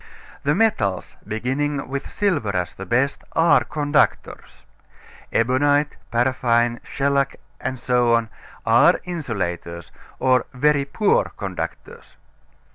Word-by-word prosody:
The 150 +2 +1
metals, 115 - 0
beginning 135 +6 -2
with 140 +1 -5
silver 145 - 0
as 90 -1 -2
the 95 - -9
best, 130 +7 0
are 165 -1 +4
conductors. 150 0 -1 0.7
Ebonite, 145 +5 +2
paraffine, 120 -1 +1
shellac, 140 -1 0 0.3
etc., 120 -2 +1 0.4
are 120 +10 +5
insulators, 90 - -4 0.3
or 130 -2 +2
very 145 +1 +2
poor 200 +9 +2
conductors. 470 0 -7
130 Hz, 95 wpm, -22 LUFS, 115-145 Hz, 0.7 s, are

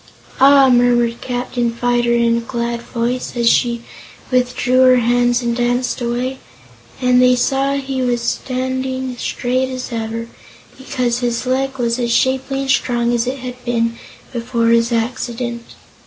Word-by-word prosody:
"Ah!" 275 0 +7
murmured 240 -1 +3
Captain 245 -1 -2
Fyter 240 0 0
in 235 0 +2
a - - -2
glad 235 0 -3
voice, 240 +1 -3
as 235 -1 +1
she 235 0 +2 0.5
withdrew 250 0 +1
her 255 -1 +6
hands 245 0 +2
and 235 0 0
danced 245 +1 -1
away, 245 +2 -2 0.6
and 250 -1 +3
they 250 0 +5
saw 270 +3 +1
he 270 -1 -3
was 245 -1 0
standing 260 +1 -3
straight 255 +1 -1
as 255 -1 -6
ever, 230 0 -4 0.5
because 250 -3 -2
his 240 0 -2
leg 265 +1 -1
was 235 0 -1
as 235 -1 -1
shapely 265 +2 +1
and 270 -1 0
strong 240 -2 +1
as 240 0 0
it 265 +2 -2
had 250 0 -8
been 230 -1 0 0.4
before 235 -1 0
his 230 +1 +3
accident. 235 0 -2
245 Hz, 150 wpm, -18 LUFS, 235-255 Hz, 0.6 s, Ah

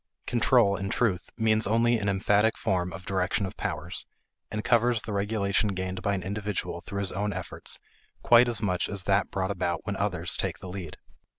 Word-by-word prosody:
Control, 120 -4 +4
in 95 0 -3
truth, 95 -7 0
means 110 -2 +2
only 115 +2 +3
an 100 -1 0
emphatic 105 +3 +3
form 90 -1 0
of 90 0 -9
direction 95 +2 0
of 95 - -6
powers, - - -4 0.4
and 110 0 -3
covers 120 -2 +3
the 110 - -4
regulation 100 0 +1
gained 95 0 -3
by 100 0 +1
an 95 - -4
individual 100 0 -3
through 100 0 -4
his 95 - 0
own 105 +2 -1
efforts - - -5 0.5
quite 120 +1 +7
as 115 -3 -2
much 90 -3 0
as 100 -2 -1
that 100 +1 +2
brought 95 0 -1
about 85 -3 -2
when 100 -2 -2
others 90 -4 -1
take - - -2
the 95 - -9
lead. 90 -4 -6
100 Hz, 190 wpm, -28 LUFS, 95-110 Hz, 0.5 s, quite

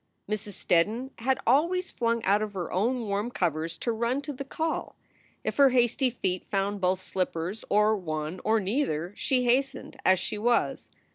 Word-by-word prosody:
Mrs. 210 0 -4
Steddon 215 +11 +1
had 260 +3 +1
always 340 +9 +2
flung 230 -1 0
out 200 +2 +3
of 215 -1 -3
her 180 -3 -4
own 240 +7 +1
warm 205 +3 -1
covers 165 -6 -1
to 235 - -1
run 235 +4 0
to 290 - -4
the 275 - -5
call. 320 +4 -3 0.5
If - - -3
her 280 -1 +7
hasty 250 +1 +2
feet 185 -6 -2
found 200 0 -1
both 185 0 +1
her - - -13
slippers 185 +2 -2
or 210 +1 +4
one 155 -2 -4
or 220 +1 +3
neither, 190 - -1
she 255 -2 +1
hastened 265 +2 0
as 185 0 +5
she 205 +3 -4
was. 235 +2 +1
215 Hz, 180 wpm, -28 LUFS, 185-250 Hz, 0.5 s, her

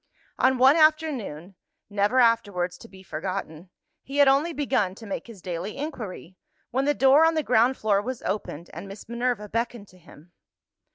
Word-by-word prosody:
On 260 0 +3
one 265 +5 +6
afternoon 290 - +1 0.3
never 205 +5 +1
afterwards 205 -7 +2
to - - -12
be 190 -3 -15
forgotten 180 -1 -5 0.3
he 275 +1 -7
had 285 -1 +6
only 280 +5 +3
begun 260 - 0
to 225 - -12
make 200 - -5
his 215 -6 -13
daily 180 +4 -5
inquiry, 220 - -7 0.3
when 265 +3 0
the 290 0 +2
door 270 +4 +5
on 325 0 +3
the 310 - 0
ground 250 +1 +3
floor 205 -2 +1
was 250 +3 -6
opened, 180 -4 -4
and 170 +5 -8
Miss 195 +1 -11
Minerva 235 -2 -2
beckoned 230 -1 -3
to 185 - -19
him. 170 0 -18
225 Hz, 175 wpm, -25 LUFS, 190-265 Hz, 0.3 s, one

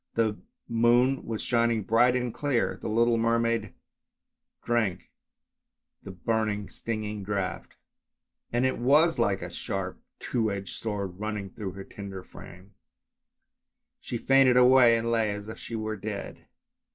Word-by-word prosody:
The 110 -2 +1 0.3
moon 120 +3 +3
was 110 -2 -3
shining 115 -2 +1
bright 120 +5 +4
and 125 -2 -1
clear. 140 -5 0
The - - -4
little 115 +1 +3
mermaid 115 -2 0 0.9
drank 110 -7 -1 0.9
the - - -10
burning, 105 +1 -1
stinging 105 -2 -4
draught, 100 -1 -4 0.8
and 120 +2 +1
it 130 - 0
was 150 +5 +4
like 100 -5 +1
a 90 - -6
sharp, 95 -1 -4 0.2
two 115 -3 -1
edged 95 -1 -5
sword 100 -4 -4
running 105 -2 -4
through 95 -2 -6
her 95 +1 -8
tender 95 -2 -8
frame; 95 +3 -13 1.3
she 120 - -5
fainted 135 0 +4
away 125 -2 +7
and 115 +1 -1
lay 115 -2 +2
as 105 0 -5
if 110 - -8
she 115 - -7
were 110 -1 -3
dead. 100 0 -6
110 Hz, 140 wpm, -27 LUFS, 100-120 Hz, 1.3 s, away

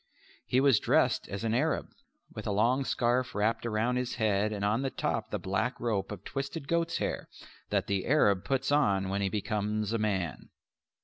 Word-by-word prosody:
He 125 - +3
was 135 -5 +5
dressed - - +2
as 100 +2 -4
an 115 -1 0
Arab, 150 +7 0 0.4
with - - -6
a - - 0
long 120 +7 +2
scarf 125 +1 0
wrapped 110 +3 0
about 115 +3 0
his 125 -1 -2
head 105 -1 +1
and 100 -1 -2
on 110 +5 +1
the 135 - -1
top - - -2
the - - -2
black 110 +7 -2
rope 105 -5 -1
of 105 - -7
twisted 140 +2 -5
goats' 170 +1 0
hair - - -3 0.4
that - - +1
the 100 -2 -1
Arab 105 -9 +3
puts 135 0 0
on 100 -10 +2
when 100 +1 -1
he 100 - +1
becomes 105 +1 -1
a 115 - 0
man. 95 -8 -2
110 Hz, 190 wpm, -30 LUFS, 100-130 Hz, 0.4 s, was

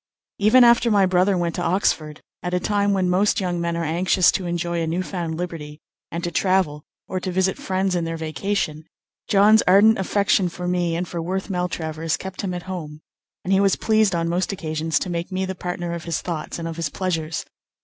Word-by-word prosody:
Even 220 +5 +6
after 235 0 +5
my 200 -3 +4
brother 185 +1 +2
went 170 -1 -1
to 175 - -3
Oxford, 165 -4 0 0.2
at 180 0 -2
a - - +2
time 205 +1 +1
when 190 -2 +1
most 190 +3 +2
young 175 -3 -2
men 170 0 -1
are 170 - -1
anxious 175 +3 +3
to 185 - -3
enjoy 170 0 -2
a 165 - -1
new 175 +3 -1
found 170 -4 -4
liberty, 160 -4 -6 0.3
and 170 0 -5
to 175 - -2
travel 185 -4 +1 0.3
or 185 - -3
to 185 0 -4
visit 190 +1 0
friends 190 0 -1
in 175 -1 0
their 165 0 -3
vacation, 160 -1 -2 0.4
John's 210 +2 +5
ardent 205 +4 +6
affection 195 -1 +2
for 180 +1 -6
me 175 -2 0
and 175 +1 -2
for 170 0 -4
Worth 190 +4 -3
Maltravers 165 -3 -2
kept 190 0 -6
him 185 -3 -3
at 175 - -6
home; 160 -5 -7 0.4
and 190 - 0
he 190 - +4
was 195 -1 +3
pleased 215 -4 +2
on 165 0 0
most 175 +4 0
occasions 160 -3 -2
to - - -2
make 170 +2 -3
me 190 0 -1
the 190 - -3
partner 175 -1 -4
of 170 -1 -6
his 170 -2 -1
thoughts 165 -4 -5
and 165 -1 -4
of 165 0 -6
his 165 -2 -2
pleasures. 165 -3 -3
180 Hz, 215 wpm, -22 LUFS, 165-190 Hz, 0.4 s, Even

